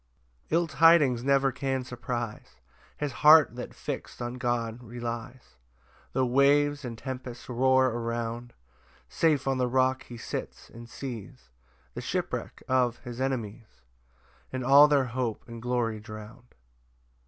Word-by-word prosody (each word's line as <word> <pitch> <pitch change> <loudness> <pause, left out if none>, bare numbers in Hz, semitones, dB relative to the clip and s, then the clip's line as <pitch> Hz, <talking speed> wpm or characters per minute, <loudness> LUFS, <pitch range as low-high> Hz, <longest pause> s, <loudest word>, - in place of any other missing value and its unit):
5 - - -33
[Ill 170 +1 +3
tidings 155 -6 +4
never 135 0 +3
can 135 0 -2
surprise 120 -2 -5 0.4
His 150 -1 -2
heart 150 -2 +6
that 125 - -7
fix'd - - -6
on 120 +1 -5
God 120 -2 -2
relies, 120 - -7 0.6
Tho' 130 - +2
waves 145 +3 +3
and 120 -3 -6
tempests 125 -1 -7
roar 130 +1 +3
around: 115 +1 -4 0.6
Safe 150 -5 +1
on 135 -1 +1
the 125 - +2
rock 130 +1 +1
he 120 - -10
sits, - - -6
and 115 0 -11
sees 115 - -8 0.4
The - - -6
shipwreck - - -4
of 125 -2 +2
his 120 0 -7
enemies, 115 - -4 0.7
And 130 0 -3
all 140 +3 +8
their 145 -3 +3
hope 125 -2 -3
and 115 -1 -9
glory 120 -3 -1
drown'd. 110 +3 -11
125 Hz, 135 wpm, -28 LUFS, 115-135 Hz, 0.7 s, all